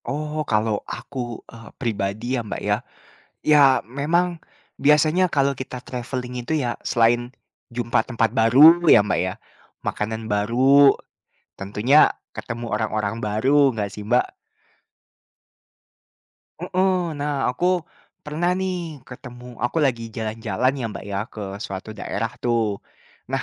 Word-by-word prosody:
Oh, 150 +2 -3
kalau 105 -1 +1
aku, 120 -4 -6
eee, 115 -1 -12
pribadi 110 0 -2
ya, 125 - 0
Mbak, 105 - -6
ya. - - +2 0.7
Ya 150 -1 +6 0.2
memang, 165 +7 0 0.4
biasanya 155 +5 +4
kalau 140 -3 +1
kita 130 -1 -7
travelling 125 0 -5
itu 140 +7 -2
ya 120 -5 -2
selain, 120 +1 +2 0.5
jumpa 120 -2 +1
tempat 115 -3 0
baru 135 +9 +7
ya, 105 - +7
Mbak, - - 0
ya. 95 0 -2 0.5
Makanan 110 +1 -3
baru. 130 +7 +5 0.6
Tentunya 105 +9 +4 0.2
ketemu 120 +1 -6
orang-orang 105 0 -1
baru, 130 +6 +2
nggak 105 -2 -3
sih 105 - -8
Mbak? 120 +3 +1 2.3
Heeh, 185 +1 +1 0.3
nah 145 +1 -1 0.2
aku, 125 +8 -4 0.6
pernah 155 +4 -1
nih 190 -1 -1 0.3
ketemu 125 -1 -11 0.2
aku 120 - -2
lagi 120 -3 -1
jalan-jalan 115 +3 -1
ya, - - -3
Mbak, - - -8
ya 100 - -2 0.2
ke 110 - -8 0.2
suatu 95 +2 -6
daerah 115 - -3
tuh. 120 -2 +2 0.7
Nah, - - 0
125 Hz, 125 wpm, -22 LUFS, 110-145 Hz, 2.3 s, baru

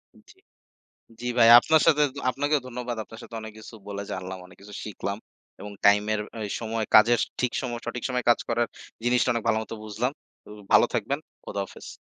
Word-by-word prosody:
উম-জি। 380 - -20 0.8
জি 125 - -3
ভাই, 115 -1 +7
আপনার 160 +4 +3
সাথেত 150 -2 +4 0.2
আপনাকেও 145 +3 0
ধন্যবাদ। 125 -1 -5
আপনার 115 - -12
সাথে 115 - -11
অনেক 110 -1 -8
কিছু 110 +1 -12
বলে 100 0 -4
জানলাম, 95 0 -5
অনেক 90 0 -18
কিছু 105 +1 -12
শিখলাম। 100 -1 -4 0.4
এবং 105 +1 -8
time 105 +1 +5
এর 105 - -1 0.2
ঐ - - -5 0.2
সময় 115 -1 -2
কাজের 115 +2 +7 0.2
ঠিক 125 -1 0
সম 125 - -4 0.2
সঠিক 120 +1 -4
সময়ে 125 -1 -2
কাজ 120 - +4
করার 120 0 +1 0.4
জিনিসটা 120 0 +3
অনেক 115 -2 -3
ভালোমত 110 -1 0
বুঝলাম। 115 +5 -2 0.4
ঔ - - -12 0.2
ভালো - - +7
থাকবেন। - - -1 0.3
খোদা-হাফেজ। 100 -1 -6
115 Hz, 180 wpm, -26 LUFS, 105-125 Hz, 0.8 s, ভাই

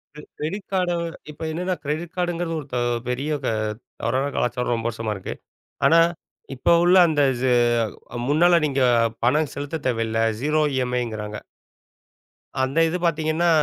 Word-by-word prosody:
கி 150 - -9 0.2
credit 190 +7 -4
கார்ட 180 -2 +1 0.4
இப்ப 150 - -16
என்னன்னா 180 +3 -1
credit 155 +4 -3
கார்டுங்கிறது 175 -2 -1
ஒரு 145 - -9
த - - 0 0.3
பெரிய 130 +4 -2 0.2
அ - - +1 0.5
தவறான 130 +4 0
கலாச்சாரம் 125 0 0
ரொம்ப 115 0 -2
வருஷமா 115 -1 -4
இருக்கு. 95 - -6 0.5
ஆனா 165 - +6 0.6
இப்போ 130 - +1
உள்ள 175 +1 +5
அந்த 155 -3 +1 0.2
சு 130 - +2 0.8
முன்னால 170 +4 +5
நீங்கப் 125 -5 +2
பணம் 145 +3 +2
செலுத்தத் 145 +1 -5
தேவையில்ல. 115 -2 0 0.2
0 150 +2 +2 0.2
EMIங்கிறாங்க. 110 -4 -3 1.2
அந்த 135 +5 0
இது 175 - -1
பாத்தீங்கன்னா, 160 +1 +1
145 Hz, 135 wpm, -23 LUFS, 125-165 Hz, 1.2 s, ஆனா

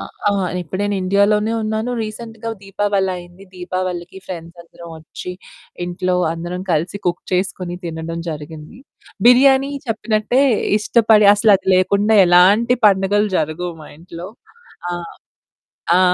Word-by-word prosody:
అ - - -5 0.3
ఆ! - - +3 0.3
ఇప్పుడు 180 +2 -6
నేను 205 0 -1
ఇండియాలోనే 205 +3 +2
ఉన్నాను 220 +2 -2
రీసెంట్‌గా 225 +1 -7
దీపావలైంది, 195 -2 -3
దీపావళికి 180 0 -5
ఫ్రెండ్స్ 170 -1 -8
అందరమోచ్చి, 170 +1 -10 0.5
ఇంట్లో 180 +1 -2 0.2
అందరం 175 +2 -5
కలిసి 170 +5 -1
కుక్ 175 0 -1
చేసుకొని 180 -1 -2
తినడం 165 0 -5
జరిగింది. 155 +5 -9 0.5
బిర్యానీ 265 +2 +5 0.2
చెప్పినట్టే 225 +2 0 0.4
ఇష్టపడి 215 -1 +4
అసలు 210 +1 +4
అది 190 - -8
లేకుండా 200 +4 +2
ఎలాంటి 200 +8 +4
పండుగలు 205 +1 +2
జరగవు 160 +3 -2
మా - - -12
ఇంట్లో. 170 +1 -9 0.6
ఆ! - - -3 1.1
ఆ! - - +4
185 Hz, 115 wpm, -18 LUFS, 175-215 Hz, 1.1 s, బిర్యానీ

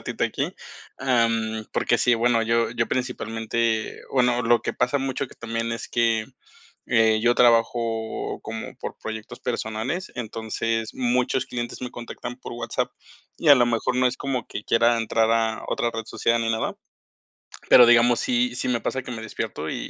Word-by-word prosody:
ratito - - -5
aquí. - - -1 0.4
Am, 115 -4 +1
porque - - +1
sí, 125 - +4
bueno, 115 0 +2
yo 115 +1 +1
yo 115 -1 -1
principalmente 115 -2 -2
bueno, 125 -2 +2
lo 120 0 +3
que - - -2
pasa 135 +3 +1
mucho 135 0 -2
que - - -16
también 115 0 -3
es 115 - -5
que, 115 -2 +1 0.6
eh, 110 -2 +3
yo 120 +2 +3
trabajo 115 -1 +1
como 110 0 -6
por - - -6
proyectos 110 0 -7
personales, 120 +10 -3
entonces 115 0 -3
muchos 125 +1 0
clientes 120 +1 -5
me 125 - -4
contactan 120 +1 -7
por - - -8
WhatsApp, 120 -1 -2 0.5
y 160 - 0
a 145 - +11
lo 120 - +4
mejor 120 +1 0
no 125 0 +3
es 125 - 0
como 135 -3 -3
que 105 - -7
quiera 115 0 +3
entrar 115 0 +1
a 115 -1 0
otra 120 - 0
red 115 0 -4
social 115 0 +1
ni 115 - 0
nada. 110 0 -2 0.9
Pero, 125 - +9
digamos, 120 0 +5
sí, 125 0 +1
sí 130 - -2
me 120 -2 0
pasa 130 - -2
que 125 - -7
me 115 -2 -5
despierto 110 - -5
y - - -3
115 Hz, 175 wpm, -24 LUFS, 115-125 Hz, 0.9 s, a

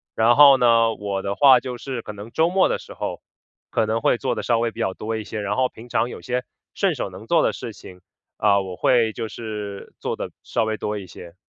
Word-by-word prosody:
然 115 +2 +4
后 140 -2 +8
呢， 115 -2 +4
我 100 -2 -3
的 100 +1 -3
话 135 -3 +7
就 125 -1 -6
是 130 -2 -5
可 105 - -8
能 105 +3 -10
周 160 +5 +2
末 185 +1 +3
的 - - -1
时 - - -12
候， - - -4 0.5
可 110 - +1
能 110 +1 -1
会 - - +3
做 130 - -1
得 - - -3
稍 120 -2 +1
微 115 0 0
比 - - -13
较 95 - -1
多 110 +1 -4
一 110 - -5
些。 105 +2 -6
然 105 0 -2
后 130 -1 +2
平 115 +2 -13
常 120 0 0
有 - - -8
些 125 0 -2 0.3
顺 195 -4 +1
手 120 -7 -4
能 95 +4 -11
做 165 +6 +3
的 - - +1
事 115 - -6
情， 90 -3 -13 0.4
嗯， 100 -2 +3
我 90 - -6
会 115 +2 +2
就 110 +1 -5
是 105 -3 -7
做 - - -3
得 - - -4
稍 110 - 0
微 110 - -1
多 105 -1 -3
一 95 -3 -8
些。 85 +1 -12
115 Hz, 270 characters per minute, -23 LUFS, 105-125 Hz, 0.5 s, 后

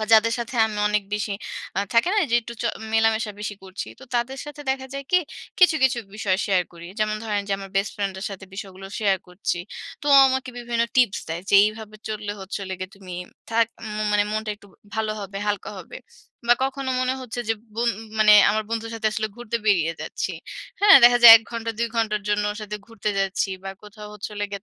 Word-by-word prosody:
বা - - 0
যাদের 225 +1 +6
সাথে 235 +2 -5
আমি 215 -1 -6
অনেক 210 0 +1
বেশি 210 0 -2 0.4
আ - - +2
থাকে 230 +7 +4
না - - +3
যে 235 - +2
একটু 235 +1 -8
চ - - -5 0.3
মেলামেশা 220 -1 +2
বেশি 210 0 -4
করছি। 190 +1 -6
তো - - -11
তাদের 245 +3 -1
সাথে 295 0 -9
দেখা 265 0 -2
যায় 275 0 -5
কি? 360 - +7 0.4
কিছু, 360 -4 +6
কিছু 245 -2 +2 0.2
বিষয় 200 -3 0
শেয়ার 190 -3 +3
করি। 170 0 -11
যেমন 215 0 +1
ধরেন 210 -2 0
যে - - 0
আমার 195 -1 -9
বেস্ট 195 +1 0
ফ্রেন্ডের 195 -1 -3
সাথে 195 -1 -8
বিষয়গুলো 195 -1 -8
শেয়ার 200 -3 +2
করছি। 180 0 -2 0.5
তো 290 - -6
ও - - +9
আমাকে 260 0 -2
বিভিন্ন 235 -1 -1
টিপস 245 -6 +3
দেয় 165 +2 -4
যে, - - +3
"এইভাবে 215 0 -4
চললে 210 -1 -4
হচ্ছে 190 +2 -5
হলো 190 0 -4
গিয়ে 185 0 -5
তুমি 185 -2 -11 0.4
থাক 230 0 +3 0.2
উম 215 0 -3
মানে 205 0 +3
মনটা 215 0 -2
একটু 205 - -19 0.3
ভালো 220 -1 -1
হবে, 195 0 -7
হালকা 205 -1 -2
হবে।" - - -10 0.5
বা 240 - +8
কখনো 270 0 -3
মনে 255 0 0
হচ্ছে 245 -1 -5
যে - - +4 0.2
বোন 235 +2 +1 0.3
মানে 215 -1 +7 0.2
আমার 220 +1 0
বন্ধুর 230 0 -3
সাথে 225 -1 -2
আসলে 215 0 -2
ঘুরতে 240 -1 -3
বেরিয়ে 170 -6 +3
যাচ্ছি, - - -3 0.5
হ্যাঁ? 405 -1 +9
দেখা 245 0 +7
যায় 235 -1 +13
১ 225 - -3
ঘন্টা 230 -1 -3
২ 235 - +1
ঘন্টার 215 -2 +1
জন্য 210 0 +1
ওর 210 - -9
সাথে 210 0 -5
ঘুরতে 225 -2 -3
যাচ্ছি 195 0 0 0.2
বা 195 - -4
কোথাও 210 0 -11
হচ্ছে 210 0 -6
হলো 205 - -2
গিয়ে 200 -1 -5
215 Hz, 215 wpm, -23 LUFS, 200-235 Hz, 0.5 s, যায়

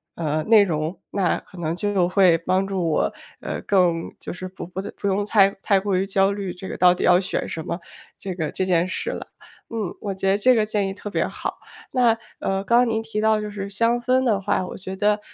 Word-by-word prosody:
呃， 155 -1 -1
内 215 -2 +6
容。 160 -1 -2
那 190 -4 +1
可 190 - -17
能 165 -1 -2
就 195 -2 +1
会 180 -2 +4
帮 185 +3 0
助 185 -4 -1
我， 155 - +1 0.3
呃， - - -4
更 175 -4 +1
就 - - -7
是 185 +1 -6
不 185 -2 -8
不 190 +2 -5
用 200 +1 +1
太 200 -2 +5
太 195 -2 +3
过 200 -1 -1
于 190 - +1
焦 195 0 +2
虑 200 -3 -4
这 190 +1 -8
个 - - -5
到 180 0 +6
底 - - -4
要 180 0 +6
选 185 - -2
什 160 - -5
么， 170 - -3 0.4
这 190 -2 -5
个 155 -4 -2
这 190 - -1
件 180 -1 +2
事 - - -3
了。 - - -5 0.4
嗯， 220 -5 -3
我 200 -2 -3
觉 190 0 -1
得 200 - +3
这 255 +5 +5
个 220 - +3
建 210 -2 -1
议 195 - -3
特 205 - -7
别 - - 0
好， - - -5 0.3
那， 250 -2 +4 0.3
呃， 195 0 -1
刚 235 +4 +3
刚 245 0 +5
您 220 0 0
提 220 -1 -4
到 215 0 +3
就 210 - -4
是 200 -1 -5
香 230 +4 +1
氛 255 +2 +2
的 220 -6 +2
话， 190 - 0
我 - - -7
觉 190 0 -6
得， 210 +1 +2
195 Hz, 255 characters per minute, -23 LUFS, 180-210 Hz, 0.4 s, 内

